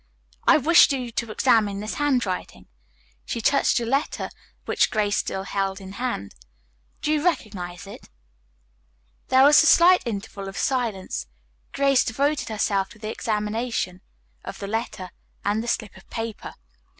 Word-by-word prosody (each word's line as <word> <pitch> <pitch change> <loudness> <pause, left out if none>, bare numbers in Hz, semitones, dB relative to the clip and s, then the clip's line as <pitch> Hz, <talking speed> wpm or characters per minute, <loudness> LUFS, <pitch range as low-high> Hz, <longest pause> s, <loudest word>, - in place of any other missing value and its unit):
I - - +7
wish 335 +3 +6
you 250 -3 -3
to 230 0 -3
examine 215 -3 +2
this 215 +1 -4
handwriting," 250 -11 -1 0.6
she - - -4
touched 280 +5 +2
the 235 - 0
letter 275 +5 -1 0.3
which - - +2
Grace 210 -1 0
still 190 - -2
held 195 0 -2
in 190 -1 -10
hand. 220 - -4 0.7
"Do 300 - +1
you 305 -1 +1
recognize 200 - -2
it?" 200 - -12 1.2
There 260 +1 +5
was 290 +2 +8
a 320 - +3
slight 360 +3 +6
interval 200 -2 -5
of 195 - -8
silence. 220 - -2 0.4
Grace 275 -2 +3
devoted 280 +5 -1
herself 200 -2 0
to 230 - -15
the 215 0 -5
examination 210 -4 -2 0.4
of - - -7
the 200 - -6
letter 215 -3 -4 0.3
and 205 +2 +1
the - - -7
slip 220 -4 -2
of - - -17
paper. 225 -2 -6
225 Hz, 150 wpm, -24 LUFS, 200-260 Hz, 1.2 s, was